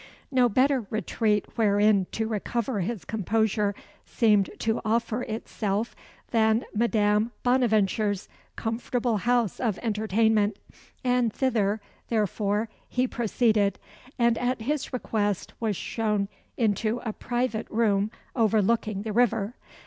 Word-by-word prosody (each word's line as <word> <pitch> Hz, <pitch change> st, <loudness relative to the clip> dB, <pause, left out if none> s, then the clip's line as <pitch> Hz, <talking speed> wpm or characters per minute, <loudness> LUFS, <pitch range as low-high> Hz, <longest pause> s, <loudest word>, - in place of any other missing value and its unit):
No 250 Hz, -2 st, +4 dB
better 255 Hz, 0 st, +2 dB
retreat 215 Hz, 0 st, 0 dB
wherein 205 Hz, -2 st, +4 dB
to 225 Hz, 0 st, -1 dB
recover 230 Hz, +2 st, -2 dB
his 195 Hz, +2 st, -3 dB
composure 210 Hz, -1 st, 0 dB, 0.3 s
seemed 210 Hz, -4 st, +3 dB
to 225 Hz, 0 st, 0 dB
offer 230 Hz, +1 st, 0 dB
itself 215 Hz, -1 st, -3 dB, 0.4 s
than 220 Hz, 0 st, +3 dB
Madame 215 Hz, 0 st, +2 dB
Bonaventure's 215 Hz, -5 st, +2 dB, 0.3 s
comfortable 230 Hz, +1 st, -1 dB
house 240 Hz, -1 st, +1 dB
of 225 Hz, -6 st, 0 dB
entertainment; 215 Hz, -1 st, +2 dB, 0.5 s
and 250 Hz, -2 st, +2 dB
thither, 220 Hz, -5 st, 0 dB, 0.3 s
therefore, 210 Hz, 0 st, 0 dB, 0.2 s
he 250 Hz, +1 st, +1 dB
proceeded, 220 Hz, -3 st, +1 dB, 0.4 s
and 235 Hz, -2 st, +3 dB
at 245 Hz, -1 st, -1 dB
his 290 Hz, +3 st, -2 dB
request 205 Hz, -6 st, -1 dB
was 220 Hz, -3 st, 0 dB
shown 210 Hz, -1 st, -1 dB, 0.3 s
into 220 Hz, +1 st, +1 dB
a 220 Hz, -, -2 dB
private 240 Hz, -1 st, -2 dB
room 210 Hz, -2 st, +2 dB, 0.3 s
overlooking 220 Hz, -2 st, +2 dB
the 215 Hz, -1 st, -3 dB
river. 235 Hz, -2 st, +2 dB
220 Hz, 110 wpm, -26 LUFS, 210-235 Hz, 0.5 s, No